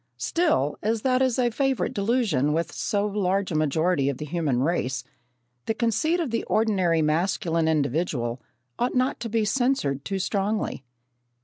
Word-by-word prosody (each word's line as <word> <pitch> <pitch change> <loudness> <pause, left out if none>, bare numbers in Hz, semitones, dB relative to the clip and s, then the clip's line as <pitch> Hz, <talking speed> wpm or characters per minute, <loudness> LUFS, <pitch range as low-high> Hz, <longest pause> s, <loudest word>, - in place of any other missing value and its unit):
Still, 305 - +1
as 220 +1 -1
that 255 -1 +2
is 260 -3 +2
a 245 -2 +2
favourite 270 +1 0
delusion 200 - +1
with 165 +1 -1
so 205 +2 -1
large 195 -2 0
a - - -2
majority 155 0 +1
of 140 - -3
the 150 - -5
human 150 -6 0
race, 135 -5 -1 0.6
the 220 - 0
conceit 250 - +1
of 315 -8 -2
the 230 - -1
ordinary 185 -7 +2
masculine 165 +1 +1
individual 140 -5 0 0.4
ought 245 +2 0
not 255 +1 +1
to 230 - -4
be 220 0 +1
censured 245 - 0
too 195 +4 -2
strongly. 200 -4 -1
190 Hz, 155 wpm, -25 LUFS, 155-230 Hz, 0.6 s, that